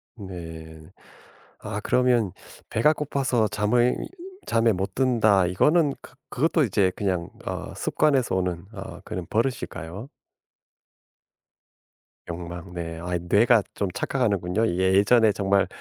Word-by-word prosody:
네. 80 -6 -9 0.7
아 - - -5
그러면 125 -6 +2 0.4
"배가 150 +8 +3
고파서 135 -6 0
잠을 120 +4 +2 0.5
잠에 115 0 +3
못 95 +1 -3
든다." 110 -8 +3
이거는 150 - +3
그 - - -14 0.2
그것도 160 +4 +2
이제 100 -5 +2
그냥 90 -4 -2 0.2
어 - - -5
습관에서 135 -9 +1
오는 90 -1 -2
어 95 -2 -8
그런 90 -1 -5
버릇일까요? 110 - -3 2.2
욕망. 85 +1 -7
네. 85 -2 -5
아이 90 0 -2
뇌가 105 +6 +4
좀 100 - -2
착각하는군요. 110 -4 0
예전에 100 +5 +4
정말 100 -1 +1
100 Hz, 235 characters per minute, -25 LUFS, 90-120 Hz, 2.2 s, 뇌가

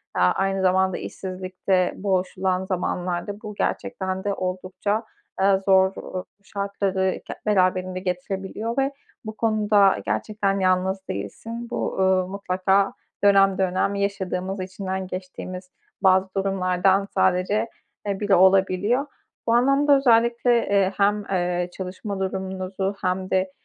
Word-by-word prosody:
aaa, 90 0 +4
aynı 195 0 0
zamanda 190 0 +2
işsizlikte 185 0 -2
boğuşulan 185 -1 -1
zamanlarda 180 +2 -3
bu 210 -1 -7
gerçekten 190 -1 -2
de 200 -1 0
oldukça, 185 +4 -2 0.3
aaa, 195 0 +4
zor, 190 0 +3
uuu, 185 0 -6 0.2
şartları 195 -2 -1
ge - - -6
beraberinde 185 -2 +1
getirebiliyor 190 +5 -4
ve 270 +1 +2 0.3
bu 215 0 -7
konuda 210 -3 +3
gerçekten 200 -2 -1
yalnız 190 +1 +1
değilsin. 230 +1 -6
Bu, - - -3
uuu, 190 -1 +2
mutlaka 195 0 +1 0.3
dönem 195 -1 +5
dönem 190 +1 +1
yaşadığımız, 195 -1 -2
içinden 190 0 -4
geçtiğimiz 185 0 -7 0.3
bazı 190 -1 +4
durumlardan 195 0 +1
sadece 190 +5 +2 0.4
e 195 -1 -1
biri 205 -2 +3
olabiliyor. 190 +7 +3 0.4
Bu 230 - +3
anlamda 275 +3 +4
özellikle, 235 -1 +3 0.2
eee, 195 -1 +2
hem, 205 +1 +2
eee, 180 -1 0
çalışma 190 +2 -5
durumunuzu 190 +1 -3
hem 185 0 -1
de, 185 0 +1
190 Hz, 120 wpm, -24 LUFS, 185-200 Hz, 0.4 s, dönem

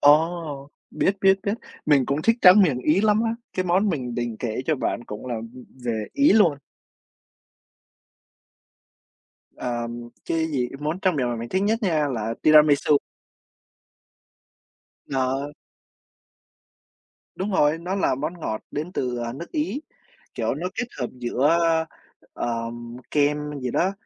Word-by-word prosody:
Ồ, 150 -2 +3 0.2
biết, 195 - +1
biết, 195 0 +5
biết. 200 +1 0 0.3
Mình 140 -4 +4
cũng 140 +3 -1
thích 230 +4 +3
tráng 190 +3 +9
miệng 140 -9 +2
Ý 155 +8 +2
lắm 215 +1 +3
á! 225 0 0 0.2
Cái 185 - -1
món 185 +4 +2
mình 125 -8 -2
định 120 -2 -3
kể 120 0 -2
cho 155 -3 +2
bạn 120 - -2
cũng 105 +4 -8
là, 120 - -2
ừm, 115 +3 -9 0.2
về 110 -3 -2
Ý 285 -3 +5
luôn. 175 -10 +4 3.0
Ờm, 120 -1 -4 0.2
cái 160 -1 0
gì? 125 -4 0
Món 155 +5 -2
tráng 185 -4 +2
miệng 125 -3 0
mà 120 - -2
mình 115 +1 -5
thích 190 +1 0
nhất 220 +3 +1
nha 155 -6 +1
là 115 -3 -2
tiramisu. 150 -1 +6 2.2
Ờ. 135 +2 -1 1.8
Đúng 195 +3 -3
rồi. 150 -3 +3
Nó 180 +3 -3
là 195 - +1
món 155 +6 -4
ngọt 110 -7 -3
đến 155 +5 -4
từ, 125 -7 -2
ờ, 120 0 -3
nước 170 +6 -8
Ý. 300 -2 -2 0.5
Kiểu, - - -1
nó 170 +5 -4
kết 245 - -2
hợp 125 - 0
giữa, 125 +3 0
ơ, 165 -1 +2 0.5
ờ, 115 -1 -3 0.4
kem 150 0 +2 0.2
gì 125 -1 -2
đó, 185 +9 +1
150 Hz, 150 wpm, -24 LUFS, 125-180 Hz, 3.0 s, tráng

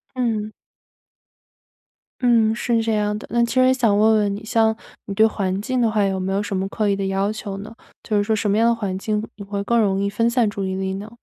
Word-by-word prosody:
嗯。 225 -4 -1 1.7
嗯， 230 -3 +4
是 230 0 0
这 225 0 0
样 210 0 0
的。 215 - -9
那 235 - +2
其 235 - -4
实 255 0 +5
想 230 -6 +2
问 220 +1 +4
问 205 -2 +1
你， 205 - -8
像 220 0 +2 0.3
你 200 - -5
对 220 - +5
环 195 -3 -1
境 255 +4 -1
的 235 -2 +3
话 215 -1 +1
有 195 -1 0
没 190 +1 -2
有 200 +1 0
什 205 - -4
么 190 +1 -1
刻 210 +1 -1
意 200 - +2
的 195 0 -3
要 195 +1 0
求 210 -2 -6
呢？ 210 +3 -9 0.3
就 215 - 0
是 205 - +2
说 220 +1 0
什 210 -1 0
么 205 - +2
样 230 +1 +4
的 235 - +3
环 200 -5 -3
境 210 +1 -1
你 200 - -7
会 200 0 -3
更 235 +3 +2
容 195 -3 +1
易 200 - 0
分 230 +3 +1
散 235 -2 +2
注 200 -1 -4
意 190 0 -2
力 190 0 -2
呢？ 205 +3 -7
210 Hz, 275 characters per minute, -21 LUFS, 200-225 Hz, 1.7 s, 实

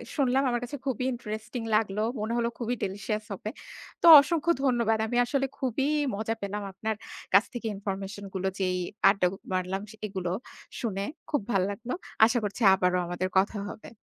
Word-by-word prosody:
শুনলাম 265 -1 +2
আমার 240 0 -1
কাছে 280 +4 -5
খুবই 255 -1 -1
ইন্টারেস্টিং 220 0 -5
লাগলো। 215 -1 +1 0.2
মনে 215 +2 -2
হলো 235 0 +1
খুবই 240 +1 -1
ডেলসিয়াস 205 +2 -2
হবে। 210 +2 -5 0.5
তো - - +1 0.2
অসংখ্য 325 +3 +1
ধন্যবাদ। 235 -4 +2
আমি 240 - -1
আসলে 270 +2 0
খুবই 265 +2 0 0.3
মজা 220 +2 -2
পেলাম 200 +1 -3
আপনার 220 +3 -3 0.4
কাছ 200 +2 +7
থেকে 240 -2 -4
ইনফরমেশন 195 0 -5
গুলো 190 0 -1
যেই 185 -1 +1 0.3
আড্ডা 195 -2 +3 0.3
মারলাম 185 +1 -1 0.3
এগুলো 190 -3 -3 0.5
শুনে 205 -6 -2 0.3
খুব 295 -5 +1
ভাল্লাগলো। 205 +5 -1 0.3
আশা 235 +2 +2
করছি 205 +3 -4
আবারো 180 -1 +2
আমাদের 175 +1 -2
কথা 205 +2 0
হবে। 215 - -11
215 Hz, 160 wpm, -28 LUFS, 195-240 Hz, 0.5 s, কাছ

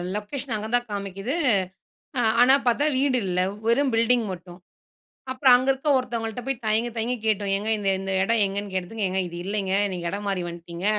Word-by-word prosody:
Location 235 +4 -4
அங்க 215 0 -4
தான் 245 -1 +1
காமிக்குது. 200 +4 -4 0.8
அ - - +3 0.2
ஆனா, 255 +2 +7
பார்த்தா 245 +5 +3
வீடு 265 -1 +2
இல்ல. 180 0 0 0.3
வெறும் 260 +4 +3
பில்டிங் 230 +1 +2
மட்டும். 175 0 -11 0.7
அப்புறம் 260 -1 +5
அங்க 255 +2 +1
இருக்க 270 +3 -7
ஒருத்தவங்கள்ட்ட 235 -2 -3
போய் 270 -3 -2
தயங்கி, 220 +2 +1
தயங்கி 235 +3 -1
கேட்டோம். 205 -2 0
ஏங்க 205 +2 -2
இந்த 200 -1 0
இந்த 195 0 -4
இடம் 225 +3 +2
எங்கேன்னு 200 0 -4
கேட்டதுக்கு 190 +3 -2
ஏங்க 190 +1 -1
இது 170 - -9
இல்லேங்க. 195 -1 -2 0.2
நீங்க 175 -2 -5
இடம் 205 +1 -5
மாறி 190 -2 -1
வந்துட்டீங்க. 170 +2 -8
215 Hz, 180 wpm, -24 LUFS, 195-245 Hz, 0.8 s, ஆனா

